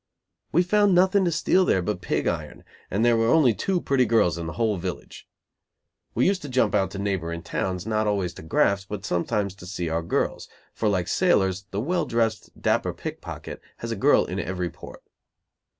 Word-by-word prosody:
We 175 Hz, -, +4 dB
found 205 Hz, +1 st, +3 dB
nothing 190 Hz, +2 st, +4 dB
to 175 Hz, -, +1 dB
steal 175 Hz, +3 st, +3 dB
there 95 Hz, -, +2 dB
but -, -, -3 dB
pig -, -, -1 dB
iron, -, -, -3 dB, 0.3 s
and 105 Hz, +5 st, +1 dB
there 120 Hz, -1 st, +5 dB
were 115 Hz, 0 st, +2 dB
only 135 Hz, -3 st, +5 dB
two 185 Hz, -, -1 dB
pretty 135 Hz, -6 st, +2 dB
girls 105 Hz, -7 st, +3 dB
in 85 Hz, -1 st, -5 dB
the 80 Hz, -, -5 dB
whole 110 Hz, -4 st, +1 dB
village. 90 Hz, 0 st, -7 dB, 0.9 s
We 120 Hz, -, +3 dB
used 190 Hz, 0 st, +2 dB
to 145 Hz, -, -7 dB
jump 125 Hz, -5 st, +2 dB
out 95 Hz, -3 st, +2 dB
to 100 Hz, -, -6 dB
neighboring 85 Hz, -4 st, -2 dB
towns, 90 Hz, +1 st, -3 dB
not 110 Hz, -1 st, 0 dB
always 95 Hz, -4 st, 0 dB
to -, -, -11 dB
graft, 100 Hz, +5 st, +1 dB
but 105 Hz, -, -5 dB
sometimes 100 Hz, +3 st, -1 dB
to 90 Hz, -2 st, -12 dB
see 90 Hz, -3 st, -3 dB
our 80 Hz, +1 st, 0 dB
girls, 85 Hz, -, -2 dB, 0.2 s
for 110 Hz, -, 0 dB
like 90 Hz, -3 st, 0 dB
sailors, 95 Hz, -, +2 dB
the 100 Hz, -, -3 dB
well 170 Hz, +3 st, 0 dB
dressed, 115 Hz, -2 st, -1 dB
dapper -, -, +1 dB
pickpocket -, -, -7 dB, 0.2 s
has -, -, -5 dB
a -, -, -1 dB
girl -, -, +4 dB
in -, -, -4 dB
every 90 Hz, +1 st, -3 dB
port. -, -, -12 dB
105 Hz, 195 wpm, -25 LUFS, 90-130 Hz, 0.9 s, there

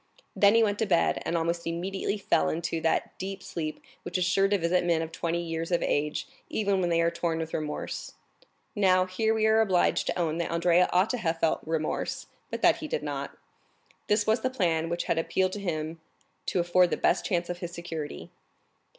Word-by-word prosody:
Then 205 Hz, +1 st, +5 dB
he 230 Hz, -, +6 dB
went 205 Hz, -1 st, 0 dB
to 220 Hz, -, +1 dB
bed 175 Hz, -4 st, +2 dB
and 170 Hz, -, +1 dB
almost 170 Hz, +1 st, -1 dB
immediately 190 Hz, +4 st, -2 dB
fell 200 Hz, -, +1 dB
into 165 Hz, 0 st, -2 dB
that 165 Hz, -, 0 dB
deep 190 Hz, 0 st, -5 dB
sleep 155 Hz, -2 st, -4 dB, 0.2 s
which -, -, -3 dB
is 180 Hz, -, +1 dB
sure 195 Hz, +2 st, +3 dB
to 205 Hz, 0 st, +2 dB
visit 180 Hz, 0 st, +1 dB
men 170 Hz, -2 st, +1 dB
of 160 Hz, -, -6 dB
twenty 170 Hz, +1 st, -2 dB
years 165 Hz, +1 st, -4 dB
of 175 Hz, -, +2 dB
age, 150 Hz, +1 st, -1 dB, 0.2 s
even 200 Hz, -3 st, +1 dB
when 175 Hz, -, +1 dB
they 170 Hz, 0 st, +3 dB
are 170 Hz, 0 st, +2 dB
torn 165 Hz, -1 st, -1 dB
with 160 Hz, 0 st, -4 dB
remorse. 150 Hz, -1 st, -4 dB, 0.6 s
Now, 185 Hz, -3 st, +4 dB
here 205 Hz, +4 st, 0 dB
we 220 Hz, -1 st, +2 dB
are 220 Hz, 0 st, +5 dB
obliged 190 Hz, -5 st, +2 dB
to -, -, -1 dB
own 165 Hz, -2 st, 0 dB
that 170 Hz, -, -1 dB
Andrea 170 Hz, +1 st, +3 dB
ought 185 Hz, +4 st, +3 dB
to 250 Hz, -, -2 dB
have 165 Hz, -5 st, -1 dB
felt 165 Hz, -, +2 dB
remorse, 160 Hz, -1 st, -2 dB, 0.2 s
but -, -, -5 dB
that -, -, +6 dB
he -, -, -6 dB
did 485 Hz, -, -2 dB
not. -, -, -5 dB, 0.7 s
This 210 Hz, 0 st, +2 dB
was 220 Hz, +2 st, +2 dB
the 255 Hz, -, +1 dB
plan 165 Hz, -9 st, 0 dB
which 170 Hz, 0 st, -1 dB
had 165 Hz, -, 0 dB
appealed 185 Hz, +3 st, +1 dB
to 205 Hz, -, -5 dB
him 160 Hz, -3 st, -3 dB, 0.5 s
to -, -, 0 dB
afford 175 Hz, +1 st, +4 dB
the -, -, -1 dB
best 180 Hz, -, +2 dB
chance 175 Hz, -3 st, 0 dB
of 175 Hz, 0 st, -5 dB
his 175 Hz, -1 st, -5 dB
security. 165 Hz, -, -6 dB
175 Hz, 210 wpm, -28 LUFS, 165-195 Hz, 0.7 s, he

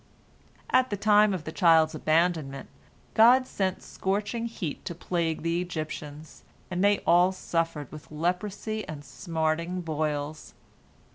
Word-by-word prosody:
At 255 Hz, 0 st, +4 dB
the 205 Hz, -, -2 dB
time 210 Hz, +1 st, +5 dB
of 185 Hz, -5 st, -3 dB
the 155 Hz, -, -6 dB
child's 160 Hz, 0 st, +4 dB
abandonment, 155 Hz, -3 st, 0 dB, 0.4 s
God 245 Hz, +4 st, +6 dB
sent 190 Hz, -6 st, -2 dB
scorching 210 Hz, +4 st, -2 dB
heat 180 Hz, -9 st, -5 dB
to 170 Hz, -, -4 dB
plague 165 Hz, -2 st, -2 dB
the 170 Hz, +1 st, 0 dB
Egyptians, 155 Hz, -3 st, -6 dB, 0.3 s
and 180 Hz, +1 st, 0 dB
they 205 Hz, 0 st, +3 dB
all 175 Hz, +2 st, +5 dB
suffered 165 Hz, -6 st, -2 dB
with 155 Hz, -1 st, -11 dB
leprosy 190 Hz, +7 st, -2 dB
and 145 Hz, -2 st, -7 dB
smarting 165 Hz, +3 st, -2 dB
boils. 155 Hz, -2 st, -3 dB
170 Hz, 130 wpm, -27 LUFS, 155-195 Hz, 0.4 s, God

